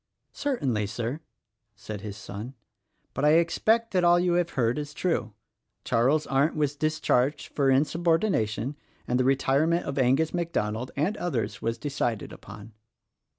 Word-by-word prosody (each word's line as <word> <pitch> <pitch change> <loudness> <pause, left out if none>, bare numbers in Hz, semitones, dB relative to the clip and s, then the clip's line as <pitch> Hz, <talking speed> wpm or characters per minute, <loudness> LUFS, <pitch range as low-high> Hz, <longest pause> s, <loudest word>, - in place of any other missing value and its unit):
"Certainly, 130 - -1
Sir," 120 +7 -3 0.6
said 105 0 -7
his 105 0 -7
son, 110 +5 -8 0.6
"but 135 - -3
I 150 +1 +5
expect 220 +8 +2
that 180 -1 +2
all 175 0 +5
you 175 0 +2
have 175 -1 +1
heard 120 +3 +2
is 150 0 -6
true. 120 - -1 0.5
Charles 130 +6 +2
Arndt 140 +4 +1
was 150 -2 0
discharged 145 -2 0
for 140 -2 +2
insubordination, 150 - +1 0.3
and 125 +1 +1
the - - +3
retirement 135 +5 +2
of 140 - -3
Angus 135 +5 +2
MacDonald, 125 -9 -2
and 165 +9 0
others, 135 -11 -2
was 115 0 -1
decided 120 -5 -2
upon." 105 +1 -12
140 Hz, 145 wpm, -27 LUFS, 115-165 Hz, 0.6 s, I